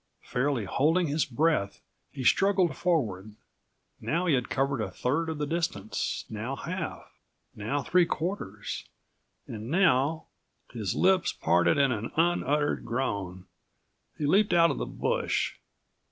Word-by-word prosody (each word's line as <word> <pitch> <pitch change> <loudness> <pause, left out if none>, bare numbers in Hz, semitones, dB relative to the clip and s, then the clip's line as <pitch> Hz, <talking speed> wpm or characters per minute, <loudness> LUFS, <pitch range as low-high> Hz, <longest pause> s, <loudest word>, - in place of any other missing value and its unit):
Fairly 125 -3 -1
holding 160 - +2
his 150 0 0
breath, 135 -6 0 0.3
he 135 - -6
struggled 185 0 +3
forward. 110 - -1 0.6
Now 170 +3 -1
he 165 - +3
had 125 -3 0
covered 135 -2 0
a 105 - -2
third 140 - -1
of 160 - -3
the 150 - -1
distance, 145 - -2
now 110 +5 -4
half, 170 +3 -6 0.4
now 135 +7 -2
three 175 +5 +3
quarters 155 - -4 0.6
and 110 +1 -7
now— 160 -3 +2 0.5
His 110 -6 -3
lips 185 0 +3
parted 85 - +2
in 140 -2 +3
an 115 -1 -3
unuttered 150 -3 +1
groan. 100 -7 -3 0.7
He 150 - -2
leaped 195 +5 +3
out 170 -1 +5
of - - -4
the - - -3
bush. - - -1
145 Hz, 135 wpm, -28 LUFS, 115-170 Hz, 0.7 s, out